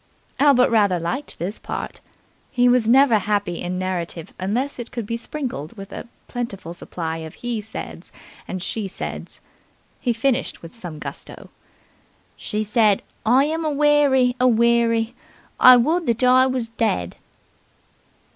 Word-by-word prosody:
Albert 275 -4 +5
rather 205 -5 +3
liked 250 - -4
this 185 +5 -4
part. - - -6 0.5
He 245 -2 +2
was 245 -2 +3
never 255 -3 +6
happy 200 -3 -1
in 180 +1 -3
narrative 180 -3 -4
unless 240 +10 -2
it 240 - -6
could 235 -3 -5
be 230 - -3
sprinkled 235 - -5
with 195 +1 -9
a - - -7 0.2
plentiful 200 -9 -5
supply 165 -2 -5
of 160 -1 -8
"he 240 -3 -3
said's" 220 +1 -8 0.4
and 185 -1 -4
"she 215 0 -3
said's." 190 - -7 0.6
He 245 - 0
finished 255 0 -1
with 165 - -10
some 175 -9 -8
gusto. - - -9 0.8
"She 210 +1 -3
said 210 -2 +2 0.2
I 255 +4 +5
am 320 +2 -2
aweary, 290 -4 +3
aweary, 235 -1 +3 0.5
I 255 0 +9
would 320 +8 +1
that 235 +1 0
I 255 +1 +6
was 255 -3 -2
dead." 220 - -1
230 Hz, 140 wpm, -22 LUFS, 195-255 Hz, 0.8 s, I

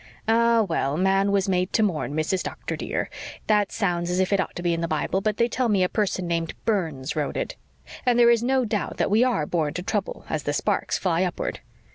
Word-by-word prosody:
"Ah, 230 0 +4
well, 155 -6 -1
man 195 +2 +2
was 200 0 +2
made 180 -1 +1
to 220 - +3
mourn, 155 -7 -1
Mrs. 160 +4 0
Doctor, - - -5
dear. - - -3 0.4
That 210 -2 +2
sounds 175 -5 -1
as 180 +1 0
if 190 +1 +1
it 200 - +3
ought - - -2
to 175 - -5
be 175 -1 +2
in 165 - -2
the 170 - -1
Bible, 160 +5 -1
but 210 +1 -1
they 235 - +3
tell 245 0 0
me 200 -3 +3
a 180 - +1
person 195 -4 -1
named 165 -1 -2
Burns 160 - -1
wrote 150 -2 -2
it. - - -3 0.5
And 245 -1 +3
there 235 -1 +7
is 235 -1 +3
no 260 +1 +2
doubt 210 -2 -2
that - - 0
we 220 +4 +5
are 240 -12 +1
born 155 -2 -1
to 180 - -3
trouble 200 0 -3
as 155 - -2
the 145 +1 -2
sparks 200 +6 0
fly 175 -2 0
upward. 180 -2 -2
190 Hz, 235 wpm, -25 LUFS, 170-215 Hz, 0.5 s, there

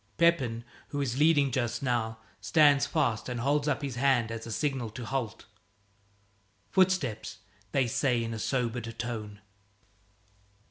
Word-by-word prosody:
Pepin, 135 -9 +2 0.2
who 145 - -4
is 135 -2 -1
leading 150 -3 +4
just 120 +2 -1
now, 115 -3 0 0.2
stands 145 -3 +4
fast 110 +1 0
and 125 -1 -3
holds 145 +3 +1
up 145 0 0
his 135 -4 -4
hand 125 -4 +2
as 115 0 -6
a - - -6
signal 135 -2 -1
to 120 +2 -7
halt. 125 -3 -3 1.3
"Footsteps," 175 - +1 0.3
they 135 -2 +2
say 125 -1 +1
in 115 0 -4
a 110 - -5
sobered 120 -2 -2
tone. 110 -3 -5
125 Hz, 140 wpm, -29 LUFS, 115-140 Hz, 1.3 s, leading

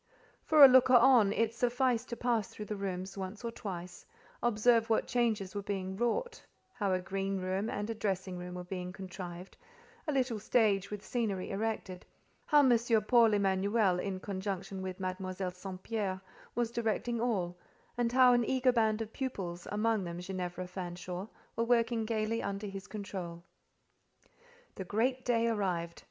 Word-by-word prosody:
For 305 -3 +9
a - - +12
looker 255 0 +6
on, 240 -4 +6
it 225 +1 +1
sufficed 245 0 +1
to 235 - -3
pass 235 -4 0
through 210 - -8
the 210 - -4
rooms 190 -1 -4
once 190 +4 -6
or 230 - -2
twice, 180 -5 -7 0.4
observe 230 0 +3
what 225 - +2
changes 220 -6 0
were 205 - -3
being 190 -1 -3
wrought, 240 - -1 0.3
how 205 -5 -1
a 185 - +2
green 195 +1 -2
room 190 +4 -1
and 205 -2 -3
a 225 - -2
dressing 190 -4 -2
room 180 0 -7
were 180 - -5
being 180 0 -5
contrived, 185 -1 -8 0.5
a - - +1
little 255 -5 0
stage 205 -3 +2
with 210 -1 -7
scenery 210 -6 -2
erected, 195 -3 -3 0.4
how 295 -3 +6
M. 245 - +6 0.3
Paul 230 -4 +5
Emanuel, 195 0 +2
in 190 0 -3
conjunction 195 -1 -4
with 185 0 -5
Mademoiselle 185 0 -3
St. 185 +1 -8
Pierre, 200 -4 -2 0.4
was 240 -1 0
directing 235 0 -1
all, 190 -8 0 0.4
and 240 -1 0
how 255 0 +6
an 240 0 +3
eager 255 +1 +2
band 225 -2 +2
of 220 - -12
pupils, 190 -10 -4
amongst 210 -1 +1
them 170 0 -5
Ginevra 180 -1 -4
Fanshawe, 180 +1 -6 0.3
were 230 - +1
working 230 -1 +2
gaily 225 0 -1
under 200 +1 -4
his 195 -1 -7
control. 185 -5 -6 1.3
The 190 - -6
great 245 +7 0
day 235 -2 +2
arrived. 180 -6 -1
205 Hz, 165 wpm, -32 LUFS, 185-230 Hz, 1.3 s, a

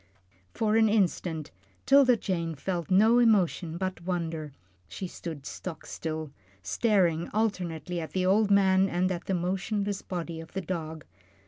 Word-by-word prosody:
For 215 - +1
an 220 -1 +5
instant 175 -6 0 0.3
'Tilda 270 -3 +6
Jane 170 -6 -2
felt 170 +4 -3
no 220 +6 +5
emotion 185 -7 +2
but 185 -1 -3
wonder. 165 -4 -3 0.4
She 190 - -6
stood 160 -5 -7
stock 165 0 -7
still, 155 -2 -5 0.3
staring 175 - +1
alternately 180 -6 -1
at 160 -2 -6
the 185 -1 0
old 205 +3 +3
man 195 -1 +4
and 180 +2 0
at 175 -2 -4
the 190 - 0
motionless 195 +3 -2
body 170 -2 -5
of 165 - -13
the 190 - -2
dog. 160 -3 -5
180 Hz, 145 wpm, -28 LUFS, 165-200 Hz, 0.4 s, Tilda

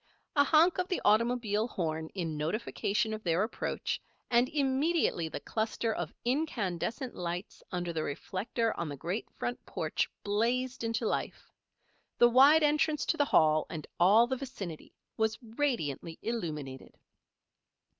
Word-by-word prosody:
A 285 - +6
honk 330 +5 +4
of 365 - 0
the 370 - -1
automobile 225 -1 +2
horn 160 -6 -3
in 165 -5 -2
notification 210 +6 -1
of 215 - -5
their 170 +2 +2
approach, 220 - -3 0.3
and 240 +1 +4
immediately 280 - +1
the - - -5
cluster 220 0 -1
of - - -4
incandescent 240 - -1
lights 175 +2 -5
under 175 -2 -2
the 160 - -1
reflector 195 - -2
on 170 -2 -2
the 145 - -6
great 180 - -3
front 120 +1 -3
porch 155 -1 -1
blazed 240 +5 0
into 230 0 -1
life. - - -3 0.7
The 240 - +7
wide 280 +6 +7
entrance 300 0 +2
to 325 - 0
the 290 - +3
Hall, 155 - +4
and 155 -3 -6
all 205 +7 +6
the 260 +2 -2
vicinity, 200 - -7 0.3
was 220 0 +1
radiantly 220 - -2
illumined. 150 - -4
220 Hz, 140 wpm, -31 LUFS, 170-255 Hz, 0.7 s, The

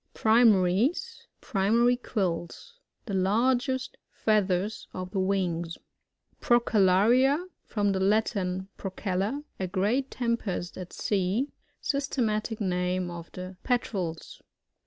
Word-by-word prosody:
Primaries, 225 - +3
(Primary 235 +3 +3
quills.)— 195 - -4 0.3
The 205 - -5
largest 245 +7 +1
feathers 205 -1 0
of 185 0 -5
the 195 - -1
wings. 180 -3 -1 0.6
Prooellaria. 240 - +4
— - - -52
From 205 -2 +1
the 190 - 0
Latin, 190 -2 +1
pro 195 - -5
cella, 200 +9 -1 0.2
a 190 - -1
great 210 +9 0
tempest 230 -7 -2
at 180 -1 -8
sea. 205 +7 0 0.3
Sys 280 0 -1
tematic 220 -3 -1
name 180 -2 -1
of 170 -1 -8
the 185 0 -7
Petrels. 190 -9 -2
200 Hz, 110 wpm, -28 LUFS, 185-240 Hz, 0.6 s, Prooellaria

